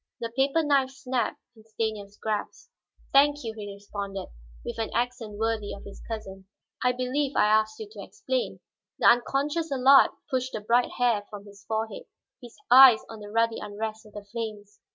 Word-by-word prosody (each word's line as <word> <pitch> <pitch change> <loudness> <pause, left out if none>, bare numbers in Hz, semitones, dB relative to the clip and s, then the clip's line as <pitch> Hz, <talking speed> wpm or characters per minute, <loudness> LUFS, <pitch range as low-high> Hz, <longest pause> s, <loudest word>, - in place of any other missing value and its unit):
The 230 -1 -4
paper 275 +4 +2
knife 280 -3 +2
snapped 260 -3 -3 0.2
in 220 - -18
Stanief's 215 -2 -4
grasp. 215 -2 -4 0.4
"Thank 290 +1 +4
you," 225 -1 -4
he 205 -2 -7
responded, 200 -1 -6 0.4
with - - -5
an 225 - -1
accent 240 -4 -2
worthy 220 -1 -1
of 200 - -12
his 200 - -11
cousin. 195 -4 -7 0.4
"I 250 - +4
believe 255 +3 -2
I - - +4
asked 215 +1 +2
you 220 - -6
to 210 -2 -9
explain." 255 +5 -3 0.4
The - - -2
unconscious 285 +6 +2
Allard 270 +1 +6 0.2
pushed 260 0 -2
the 215 - -4
bright 235 +4 +2
hair 230 -5 +1
from 205 -1 -9
his 200 0 -15
forehead, 220 0 -3 0.4
his 240 -2 -12 0.2
eyes 255 -3 +9
on 225 - -9
the 205 0 -9
ruddy 230 +1 +1
unrest 220 +1 -6
of 210 - -18
the 210 - -8
flames. 210 -2 -7
225 Hz, 175 wpm, -27 LUFS, 210-255 Hz, 0.4 s, eyes